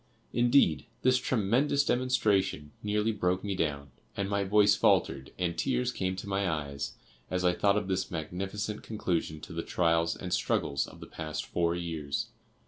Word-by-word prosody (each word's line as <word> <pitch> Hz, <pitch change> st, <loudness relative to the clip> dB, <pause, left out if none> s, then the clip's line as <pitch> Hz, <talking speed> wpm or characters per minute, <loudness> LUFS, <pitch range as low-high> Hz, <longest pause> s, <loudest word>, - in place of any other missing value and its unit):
Indeed, 120 Hz, -, +4 dB, 0.2 s
this 130 Hz, 0 st, +4 dB
tremendous 130 Hz, +6 st, +2 dB
demonstration 105 Hz, -11 st, +1 dB
nearly 105 Hz, +1 st, +1 dB
broke 90 Hz, -3 st, 0 dB
me 100 Hz, -1 st, -1 dB
down, 70 Hz, -6 st, -2 dB, 0.3 s
and 100 Hz, -1 st, 0 dB
my 100 Hz, 0 st, 0 dB
voice 105 Hz, +1 st, +5 dB
faltered 65 Hz, 0 st, +2 dB
and 85 Hz, -2 st, -1 dB
tears 125 Hz, +1 st, 0 dB
came 95 Hz, -4 st, -2 dB
to 95 Hz, -, -7 dB
my 100 Hz, -1 st, 0 dB
eyes 70 Hz, -3 st, -3 dB, 0.3 s
as 90 Hz, 0 st, -1 dB
I 90 Hz, -, +4 dB
thought 100 Hz, +2 st, +3 dB
of 105 Hz, -2 st, -1 dB
this 95 Hz, 0 st, -1 dB
magnificent 95 Hz, +6 st, -4 dB
conclusion 85 Hz, -7 st, -2 dB
to 85 Hz, -, -9 dB
the 85 Hz, -, -2 dB
trials 85 Hz, -1 st, +1 dB
and -, -, -5 dB
struggles 70 Hz, 0 st, 0 dB
of -, -, -13 dB
the -, -, -7 dB
past 80 Hz, -1 st, -5 dB
four 85 Hz, 0 st, 0 dB
years. 80 Hz, -5 st, -3 dB
95 Hz, 165 wpm, -30 LUFS, 80-105 Hz, 0.3 s, voice